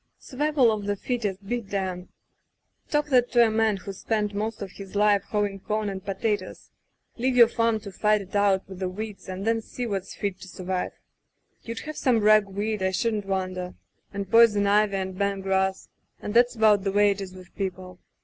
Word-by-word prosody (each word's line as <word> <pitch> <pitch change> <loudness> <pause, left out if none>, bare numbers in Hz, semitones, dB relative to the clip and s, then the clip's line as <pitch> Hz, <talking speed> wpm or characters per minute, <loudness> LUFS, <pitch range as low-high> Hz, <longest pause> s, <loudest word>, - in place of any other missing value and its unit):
Survival 280 -3 +1
of 210 -2 -3
the 205 - 0
fittest 205 -3 -3
be 240 +2 -1
damned! 190 -3 -4 0.8
Talk 295 0 0
that 250 -3 +3
to 240 -1 +6
a 220 - +1
man 220 -2 +2
who's 195 0 -8
spent 210 -2 -1
most 215 +1 -3
of 195 - -8
his 195 0 -11
life 205 -1 +4
hoeing 205 -2 -1
com 215 +1 -2
and 190 -1 -6
potatoes. 200 0 -3 0.5
Leave 255 +2 0
your 235 -2 +8
farm 230 -1 +1
to 200 - -8
fight 210 +2 +2
it 195 0 -10
out 200 -2 +2
with 190 -1 -10
the 185 -1 -1
weeds 200 -1 -7
and 185 +2 -5
then 225 0 +1
see 245 +2 -6
what's 195 -4 -4
fit 200 -2 -3
to - - -10
survive. 185 +1 -3 0.7
You'd 230 0 -6
have 305 -1 -7
some 245 -4 +2
rag 215 -1 +5
weed, 205 +2 -3
I 190 - +2
shouldn't 210 +1 -1
wonder 185 -2 -3 0.2
— - - -46
and 200 -1 -4
poison 210 -1 +5
ivy 205 0 +3
and 190 -1 -3
bent 200 0 -1
grass 190 0 0 0.2
— - - -46
and 205 - -5
that's 245 +1 +4
about 215 -3 +4
the 195 - 0
way 205 +1 +4
it 200 0 -4
is 190 -1 -7
with 185 -1 -14
people. 185 -2 -5
205 Hz, 205 wpm, -26 LUFS, 190-220 Hz, 0.8 s, your